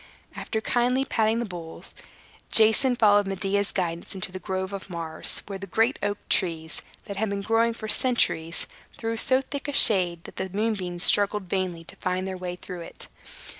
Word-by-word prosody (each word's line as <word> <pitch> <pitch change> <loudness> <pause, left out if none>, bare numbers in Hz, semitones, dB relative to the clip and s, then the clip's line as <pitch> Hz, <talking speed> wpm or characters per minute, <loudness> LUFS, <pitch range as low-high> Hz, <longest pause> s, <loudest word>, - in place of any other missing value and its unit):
After 220 - -4
kindly 250 +3 0
patting 220 -3 0
the 235 - -2
bulls, 170 -5 -9 0.6
Jason 225 +4 +5
followed 205 -3 +3
Medea's 195 +1 -1
guidance 170 -1 -3
into 185 -1 0
the 185 - -7
Grove 190 0 -4
of 195 0 -7
Mars, 165 -2 -2
where 195 -1 -7
the 195 - -8
great 225 +8 0
oak 205 0 -2
trees, 160 -3 -1 0.2
that 200 - -7
had 220 +1 -1
been 200 0 -4
growing 225 +2 +1
for 220 -1 -8
centuries, 210 -8 +1 0.3
threw 225 0 -3
so 260 +3 +2
thick 280 +1 -7
a 290 - -4
shade 180 -9 +7
that - - -13
the 190 - -4
moonbeams 195 -3 -2
struggled 205 0 +4
vainly 180 -2 -3
to - - -12
find 185 +1 -3
their 190 - -5
way 180 -1 -6
through 180 -1 -9
it. - - -10
195 Hz, 180 wpm, -25 LUFS, 180-225 Hz, 0.6 s, shade